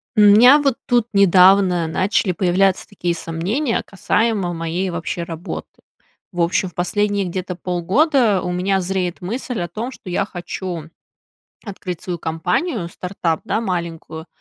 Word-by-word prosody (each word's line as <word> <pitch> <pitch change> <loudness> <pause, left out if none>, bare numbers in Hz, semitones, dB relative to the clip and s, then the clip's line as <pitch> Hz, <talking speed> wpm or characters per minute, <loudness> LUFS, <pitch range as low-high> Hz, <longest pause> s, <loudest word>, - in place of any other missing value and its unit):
М, 210 - +5
у - - +8
меня 250 +7 +8
вот 275 -4 +1
тут 240 -3 +2
недавно 185 -2 +5
начали 190 +3 +1
появляться 185 +2 +1
такие 175 -4 -2
сомнения 180 - -2
касаемо 200 -2 0
моей 165 +3 -2
вообще 170 0 -4
работы. 170 +2 -6 0.6
В 175 -2 -2
общем, 180 +3 +1
в - - -24
последние 205 +2 0
где-то 180 0 -4
полгода, 200 - +1
у 180 - -3
меня 190 +2 0
зреет 185 -1 -2
мысль 230 +4 -4
о 175 - -2
том, 220 +9 -5
что 195 - -11
я 180 +2 0
хочу 175 -3 -6 0.8
открыть 190 -5 -6
свою 175 -2 -4
компанию 175 - -2
стартап, 175 -2 -3
да, 220 - -1
маленькую. 170 -4 -4
185 Hz, 145 wpm, -20 LUFS, 175-205 Hz, 0.8 s, у